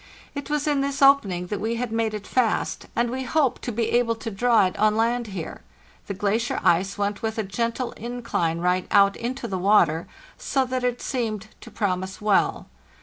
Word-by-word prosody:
It 285 Hz, 0 st, -6 dB
was 295 Hz, -1 st, 0 dB
in 290 Hz, -2 st, +2 dB
this 280 Hz, 0 st, -1 dB
opening 205 Hz, -11 st, +4 dB
that 205 Hz, -, -2 dB
we 225 Hz, +2 st, -1 dB
had 240 Hz, -1 st, -3 dB
made 225 Hz, -1 st, 0 dB
it 205 Hz, -1 st, -7 dB
fast, 245 Hz, -4 st, 0 dB
and 235 Hz, 0 st, +1 dB
we 260 Hz, +1 st, -3 dB
hoped 265 Hz, 0 st, +1 dB
to 245 Hz, -, -3 dB
be 230 Hz, 0 st, -1 dB
able 240 Hz, -1 st, +2 dB
to 225 Hz, 0 st, -6 dB
draw 230 Hz, +1 st, +3 dB
it 185 Hz, -, -2 dB
on 215 Hz, 0 st, +3 dB
land 235 Hz, +1 st, +1 dB
here; 190 Hz, -6 st, -6 dB, 0.5 s
the 200 Hz, -, -4 dB
glacier 210 Hz, +4 st, 0 dB
ice 185 Hz, +3 st, +2 dB
went 205 Hz, 0 st, -2 dB
with 220 Hz, 0 st, -2 dB
a 220 Hz, -, 0 dB
gentle 235 Hz, +5 st, -2 dB
incline 230 Hz, -8 st, -2 dB
right 180 Hz, +1 st, 0 dB
out 200 Hz, -1 st, +5 dB
into 240 Hz, +1 st, -4 dB
the 190 Hz, -4 st, -3 dB
water, 175 Hz, -5 st, +3 dB, 0.3 s
so 270 Hz, -1 st, 0 dB
that 255 Hz, 0 st, -3 dB
it 245 Hz, -1 st, -1 dB
seemed 220 Hz, -5 st, -3 dB
to -, -, -11 dB
promise 190 Hz, -3 st, -2 dB
well. 210 Hz, -2 st, +1 dB
225 Hz, 200 wpm, -24 LUFS, 200-245 Hz, 0.5 s, out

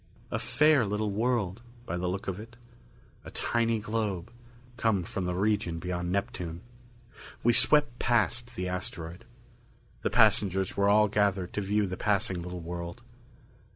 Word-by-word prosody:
A 115 Hz, -, -1 dB
fair 130 Hz, +4 st, +4 dB
little 105 Hz, 0 st, -1 dB
world, 110 Hz, -2 st, 0 dB, 0.2 s
by 85 Hz, -, -3 dB
the 90 Hz, +1 st, -2 dB
look 95 Hz, +2 st, -3 dB
of 95 Hz, 0 st, -3 dB
it. 115 Hz, +2 st, -11 dB, 0.7 s
A -, -, -9 dB
tiny 115 Hz, -1 st, +1 dB
globe, 105 Hz, -3 st, -2 dB, 0.4 s
come 110 Hz, -6 st, +1 dB
from 90 Hz, +2 st, -4 dB
the 90 Hz, -, -1 dB
region 100 Hz, -3 st, +1 dB
beyond 90 Hz, +1 st, -3 dB
Neptune. 90 Hz, -5 st, -3 dB, 0.8 s
We 120 Hz, -, +5 dB
swept 120 Hz, 0 st, +4 dB
past 120 Hz, 0 st, +1 dB
the 90 Hz, -4 st, -2 dB
asteroid. 90 Hz, -2 st, -5 dB, 0.8 s
The -, -, 0 dB
passengers 95 Hz, -1 st, +3 dB
were 100 Hz, 0 st, +3 dB
all 105 Hz, +1 st, +5 dB
gathered 100 Hz, -3 st, +1 dB
to 105 Hz, -, -1 dB
view 105 Hz, +1 st, +1 dB
the 90 Hz, -1 st, -4 dB
passing 100 Hz, -3 st, 0 dB
little 90 Hz, 0 st, -6 dB
world. 85 Hz, +5 st, -6 dB
100 Hz, 150 wpm, -29 LUFS, 90-115 Hz, 0.8 s, We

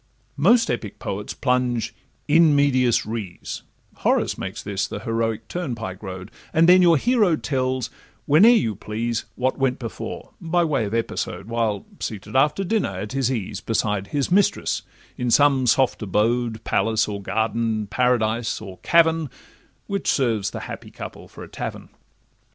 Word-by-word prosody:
Most 230 Hz, -, +4 dB
epic 115 Hz, -4 st, -4 dB
poets 100 Hz, +1 st, -5 dB
plunge 125 Hz, -3 st, 0 dB, 0.3 s
'in 155 Hz, 0 st, +5 dB
medias 130 Hz, -4 st, +3 dB
res' 105 Hz, -5 st, -5 dB, 0.4 s
(Horace -, -, +1 dB
makes -, -, -6 dB
this 100 Hz, 0 st, -2 dB
the 100 Hz, -, -6 dB
heroic 115 Hz, -1 st, -2 dB
turnpike 115 Hz, -, -4 dB
road), 95 Hz, 0 st, -7 dB, 0.2 s
And 165 Hz, 0 st, +4 dB
then 185 Hz, +1 st, +7 dB
your 170 Hz, -3 st, +6 dB
hero 215 Hz, -, +3 dB
tells, 130 Hz, -4 st, -2 dB, 0.3 s
whene'er 160 Hz, +11 st, +7 dB
you 220 Hz, -, +3 dB
please, 115 Hz, +3 st, -3 dB
What 130 Hz, +2 st, -1 dB
went 130 Hz, -1 st, +1 dB
before—by 165 Hz, +8 st, -3 dB
way 150 Hz, -8 st, 0 dB
of 105 Hz, +2 st, -3 dB
episode, 115 Hz, -3 st, -3 dB
While 115 Hz, -4 st, -1 dB
seated 105 Hz, +1 st, -6 dB
after 150 Hz, +8 st, +3 dB
dinner 190 Hz, -, -1 dB
at 105 Hz, +3 st, -5 dB
his 135 Hz, -2 st, 0 dB
ease, 110 Hz, -7 st, -3 dB
Beside 105 Hz, -3 st, -1 dB
his 145 Hz, -, -1 dB
mistress 195 Hz, +2 st, +2 dB, 0.4 s
in 125 Hz, -1 st, 0 dB
some 135 Hz, 0 st, +4 dB
soft 130 Hz, +1 st, +3 dB
abode, 110 Hz, +3 st, 0 dB
Palace, 110 Hz, -1 st, +1 dB
or 100 Hz, -1 st, -4 dB
garden, 110 Hz, +2 st, -1 dB
paradise, 115 Hz, 0 st, +1 dB
or 95 Hz, -4 st, -10 dB
cavern, 165 Hz, -3 st, +3 dB, 0.6 s
Which 200 Hz, -1 st, -3 dB
serves 115 Hz, -7 st, +1 dB
the -, -, -6 dB
happy -, -, -8 dB
couple -, -, -9 dB
for -, -, -11 dB
a -, -, -9 dB
tavern. -, -, -6 dB
120 Hz, 150 wpm, -23 LUFS, 110-145 Hz, 0.6 s, then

